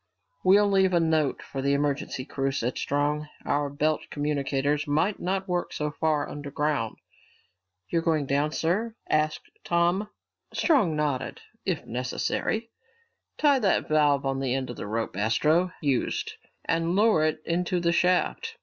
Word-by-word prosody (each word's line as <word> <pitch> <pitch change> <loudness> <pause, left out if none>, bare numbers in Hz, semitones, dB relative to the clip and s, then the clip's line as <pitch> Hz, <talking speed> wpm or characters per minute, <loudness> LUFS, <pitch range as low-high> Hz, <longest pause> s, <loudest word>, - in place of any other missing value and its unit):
"We'll 205 +2 +6
leave 190 -2 +3
a 170 - +4
note 160 -4 +1
for 135 - -5
the 140 +1 +2
emergency 140 -2 -1
crew," 135 -1 -1
said 125 -2 -2
Strong. 145 +1 0 0.2
"Our 145 0 0
belt 150 +2 0
communicators 145 0 -1
might 160 +8 +1
not 190 +2 -2
work 180 -1 -1
so 150 0 -2
far 155 -1 0
underground." 145 -4 -2 0.9
"You're 165 - 0
going 160 -3 +1
down, 145 +3 +1
sir?" 205 +9 -1
asked 155 0 0
Tom. 175 +4 +1 0.5
Strong 215 - +3
nodded. 145 -4 -2 0.2
"If 185 -5 -1
necessary. 130 - -2 0.7
Tie 285 -3 +4
that 205 -5 +1
valve 145 -2 +3
on 135 0 0
the 130 -2 0
end 130 -2 -2
of - - -8
the - - -6
rope 110 -2 -2
Astro 150 - +2
used 140 -4 0 0.3
and 165 +2 0
lower 210 -6 +4
it 155 0 +1
into 175 +1 0
the 170 0 +2
shaft. 180 - +1
155 Hz, 150 wpm, -27 LUFS, 140-180 Hz, 0.9 s, We'll